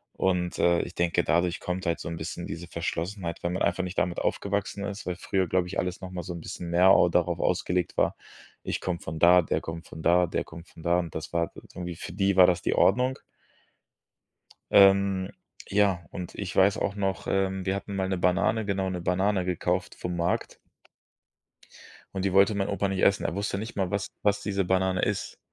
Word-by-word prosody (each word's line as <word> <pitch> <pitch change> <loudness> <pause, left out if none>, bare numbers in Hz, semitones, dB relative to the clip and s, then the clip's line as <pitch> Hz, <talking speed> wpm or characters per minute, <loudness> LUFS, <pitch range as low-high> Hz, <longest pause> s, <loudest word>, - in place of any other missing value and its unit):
Und, 90 -2 0
äh, 85 -1 +4
ich - - -8
denke, 85 -1 +1
dadurch 85 +2 +1
kommt 90 +1 -4
halt 85 - 0
so - - -6
'n 85 - -5
bisschen 85 +2 -5
diese 85 +2 -6
Verschlossenheit, 85 +1 -4
weil 85 - 0
man 90 - -1
einfach 95 - +1
nicht 90 0 -6
damit 85 -1 -1
aufgewachsen 100 0 -2
ist. 100 0 -6
Weil 90 - -1
früher, 95 -1 0
glaube 90 +1 +1
ich, 90 - -3
alles 90 +1 -3
noch 95 -1 -7
mal 90 -1 -4
so 90 - -6
'n 85 - -6
bisschen 85 +1 -7
mehr 90 +3 +5
au - - +6
darauf - - +1
ausgelegt 90 -1 0
war: - - +2 0.5
Ich - - -2
komme 90 -2 -2
von 80 +1 -6
da, 90 +2 +7
der 80 - -1
kommt 80 +1 -7
von 80 - -10
da, 90 +1 +4
der - - -2
kommt 85 +2 -12
von 80 - -14
da. 85 +1 +3
Und 85 -3 -5
das 80 +1 -6
war 85 -1 0 0.2
irgendwie 90 -1 -5
für 85 - -8
die 100 +1 +1
war 90 - +9
das 90 -1 +1
die - - 0
Ordnung. 125 +6 +3 1.5
Ähm, 95 -1 +5 0.4
ja, 100 -4 +2
und 90 -2 -6
ich 100 -3 -5
weiß 95 +1 +4
auch 100 - -2
noch, 95 -1 -2
ähm: 95 -1 0
Wir 95 0 0
hatten 100 +1 -6
mal 95 -1 0
'ne 95 0 -1
Banane 90 +5 +1
genau, 95 -1 -1
'ne 90 -1 -4
Banane 95 +2 +1
gekauft 90 0 -1
vom 90 0 -4
Markt 85 0 -1 1.6
und 95 0 -1
die 95 - 0
wollte 100 +2 +5
mein 100 -1 -1
Opa 100 0 0
nicht 95 -1 -2
essen. 100 - +3
Er 85 - -1
wusste 100 0 -2
nicht 110 +3 -6
mal, 95 -3 0
was 100 0 -2
was 100 0 +2
diese 100 -2 -1
Banane 95 0 +1
ist. - - -2
95 Hz, 215 wpm, -27 LUFS, 85-100 Hz, 1.6 s, war